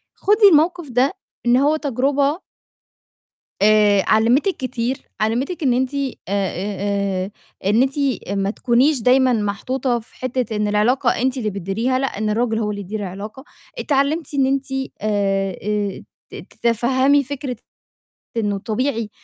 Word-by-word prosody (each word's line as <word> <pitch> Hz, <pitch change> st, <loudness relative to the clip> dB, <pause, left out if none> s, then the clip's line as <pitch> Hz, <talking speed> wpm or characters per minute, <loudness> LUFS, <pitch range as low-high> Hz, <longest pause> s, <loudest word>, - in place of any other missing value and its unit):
خدي 415 Hz, +1 st, +5 dB
الموقف 325 Hz, 0 st, +2 dB
ده 260 Hz, +8 st, +2 dB, 0.3 s
إن 240 Hz, +1 st, +5 dB
هو 290 Hz, +3 st, +3 dB
تجربة 280 Hz, +3 st, 0 dB, 1.2 s
آآ، 205 Hz, -1 st, +5 dB
علّمِتِك 240 Hz, -, +3 dB
كتير، 255 Hz, -1 st, -2 dB, 0.2 s
علّمِتِك 265 Hz, +10 st, -1 dB
إن 255 Hz, -3 st, +3 dB
أنتِ 260 Hz, +2 st, 0 dB
آآ، -, -, -1 dB, 0.3 s
آآ، 200 Hz, -1 st, 0 dB, 0.7 s
آآ، 190 Hz, -, -5 dB, 0.4 s
إن 210 Hz, +5 st, +3 dB
أنتِ 270 Hz, +2 st, 0 dB, 0.3 s
أ 200 Hz, -, -2 dB
ما 195 Hz, 0 st, 0 dB
تكونيش 255 Hz, +5 st, +2 dB
دايمًا 255 Hz, +2 st, +4 dB
محطوطة 240 Hz, +4 st, -1 dB
في 225 Hz, -, -16 dB
حتّة 255 Hz, -3 st, -2 dB
إن 210 Hz, 0 st, 0 dB
العلاقة 225 Hz, +5 st, +2 dB
أنتِ 260 Hz, +1 st, 0 dB
اللي 215 Hz, -4 st, -1 dB
بتديريها، 205 Hz, +7 st, -1 dB
لأ، 270 Hz, -, 0 dB
إن 215 Hz, +1 st, -1 dB
الراجل 225 Hz, +1 st, 0 dB
هو 210 Hz, -2 st, -1 dB
اللي 205 Hz, -1 st, -5 dB
يدير 210 Hz, +3 st, -5 dB
العلاقة، 205 Hz, +6 st, -7 dB, 0.4 s
اتعلمتِ 290 Hz, +2 st, 0 dB
إن 275 Hz, -2 st, +2 dB
أنتِ، 270 Hz, +1 st, 0 dB, 0.4 s
آآ، 195 Hz, -3 st, 0 dB
آآ، 205 Hz, -2 st, -2 dB, 0.3 s
ت -, -, -10 dB
تَتَفهّمي 260 Hz, +5 st, +1 dB
فكرة 270 Hz, -1 st, -5 dB, 0.8 s
إنه 205 Hz, -3 st, 0 dB
طبيعي، 230 Hz, +1 st, -2 dB
245 Hz, 145 wpm, -20 LUFS, 210-270 Hz, 1.2 s, خدي